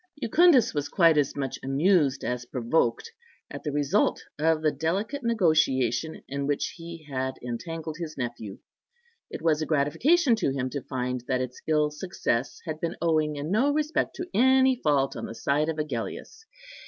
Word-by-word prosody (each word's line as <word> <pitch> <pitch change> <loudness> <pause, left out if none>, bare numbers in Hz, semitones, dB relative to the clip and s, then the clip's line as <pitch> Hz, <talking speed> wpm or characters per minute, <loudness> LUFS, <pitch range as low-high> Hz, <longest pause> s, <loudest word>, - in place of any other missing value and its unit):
Jucundus 295 +2 +4
was 145 -1 -2
quite 165 -2 +4
as 140 - 0
much 135 -2 -3
amused 145 +1 +2
as 125 0 -3
provoked 120 0 0 0.4
at - - -7
the 150 - -3
result 145 -1 +1 0.2
of 160 0 +2
the 155 - +3
delicate 190 - -2
negotiation 160 - +1
in 140 0 -3
which 145 -1 -1
he 165 -1 -9
had 130 -1 -3
entangled 155 +6 -5
his 160 -3 -6
nephew. 120 -5 -5 0.7
It - - -7
was 160 -2 +2
a 155 - -2
gratification 235 - +3
to 195 - 0
him 130 -1 -3
to 140 - -3
find 125 -1 -3
that 130 -1 0
its 125 0 -6
ill 150 -1 +2
success 150 -6 -2
had 155 -2 -4
been 170 0 -2
owing 155 -2 +1
in 145 +3 -4
no 250 +8 +3
respect 305 +1 -1
to 360 - -5
any 260 +1 +4
fault 140 -3 +2
on - - -5
the 115 - -8
side 150 +5 0
of 160 - -3
Agellius. 150 - -5
150 Hz, 170 wpm, -26 LUFS, 135-170 Hz, 0.7 s, Jucundus